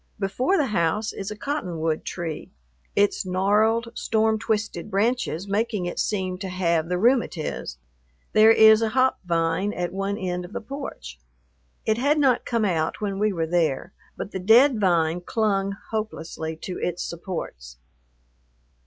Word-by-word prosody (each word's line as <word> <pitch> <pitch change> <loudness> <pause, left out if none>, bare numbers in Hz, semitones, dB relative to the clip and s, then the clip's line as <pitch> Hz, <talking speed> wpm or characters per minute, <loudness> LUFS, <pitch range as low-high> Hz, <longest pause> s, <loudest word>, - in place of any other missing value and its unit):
Before 245 - 0
the 295 - +2
house 210 -1 0
is 195 - -5
a 210 - -5
cotton 210 - -3
wood 160 -1 -1
tree, 165 -4 -5 0.5
its 205 0 +2
gnarled, 210 +5 +2
storm 220 0 +1
twisted 215 -3 -2
branches 205 -3 0
making 210 -1 -1
it 175 - -4
seem 185 -3 -1
to 190 -1 -4
have 170 -3 0
the 180 - 0
"rheumatiz." 195 - 0 0.6
There 215 +1 +7
is 220 0 +7
a 225 - +1
hop 260 +3 +2
vine 165 +3 0
at 175 0 -3
one 195 +1 -2
end 180 -2 -3
of 175 +3 -11
the - - -3
porch. 215 - -8 0.7
It 220 +1 +1
had 285 +4 +2
not 265 -5 +3
come 230 -3 +1
out 165 -3 0
when 200 -2 -3
we 210 0 +2
were 165 -4 -1
there, 160 -4 0 0.2
but - - -5
the 190 - -4
dead 230 +6 +5
vine 170 -3 +2
clung 200 -1 0 0.2
hopelessly 165 -7 -4
to 180 +3 -6
its 175 0 -2
supports. 60 - -6
195 Hz, 155 wpm, -24 LUFS, 175-220 Hz, 0.7 s, There